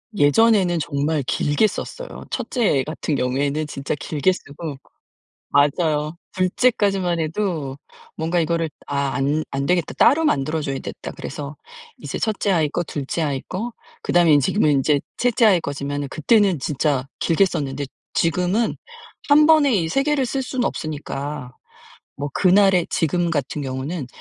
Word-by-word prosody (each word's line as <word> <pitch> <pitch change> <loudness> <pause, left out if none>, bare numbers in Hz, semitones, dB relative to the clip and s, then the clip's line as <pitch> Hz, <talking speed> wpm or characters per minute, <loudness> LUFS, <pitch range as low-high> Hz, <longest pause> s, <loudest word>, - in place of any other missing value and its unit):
예전에는 185 +1 +4
정말 145 +1 -1
길게 145 - +2
썼어요. - - -7
1 - - -4
째애 205 - +2
같은 155 0 -3
경우에는 140 +4 0
진짜 140 0 -3
길게 155 +5 +1
쓰고 150 -3 -7 0.7
맞아요. 150 +2 +2 0.2
2 185 -1 +1
째까지만 195 -7 +1
해도 160 -5 -2 0.4
뭔가 165 +2 0
이거를 165 0 0 0.2
'아 140 -1 -1
안 145 +3 0
안되겠다. 140 +5 0
따로 320 +3 +5
만들어 155 - +1
줘야겠다.' 135 -2 -5
그래서 145 0 -6 0.4
이제 - - -5
1 215 -3 -1
째 205 - +1
아이 160 -4 +2
거, 175 - -2
2 145 -4 -5
째 165 - -2
아이 140 -3 -1
거, 225 +6 -4 0.3
그다음에 170 -4 +4
지금은 150 +3 +2
인제 140 +1 +2 0.2
3 240 -2 +3
아이 185 -5 +5
거지만 145 0 -3
그때는 195 - +3
진짜 140 -1 0
길게 170 +4 +3
썼는데 140 -5 -2 0.3
지금은 180 +7 +1 0.5
1 300 +1 +6
번에 300 -6 +5
이 165 -5 +1
3 275 +11 +1
개를 290 -2 +1
쓸 265 +2 -2
수는 255 -1 -2
없으니까 145 -3 -4 0.6
뭐 145 0 -4
그날에 190 -2 +4
지금 170 +2 0
같은 145 -1 -2
경우는 135 +2 -4
160 Hz, 290 characters per minute, -22 LUFS, 145-195 Hz, 0.7 s, 1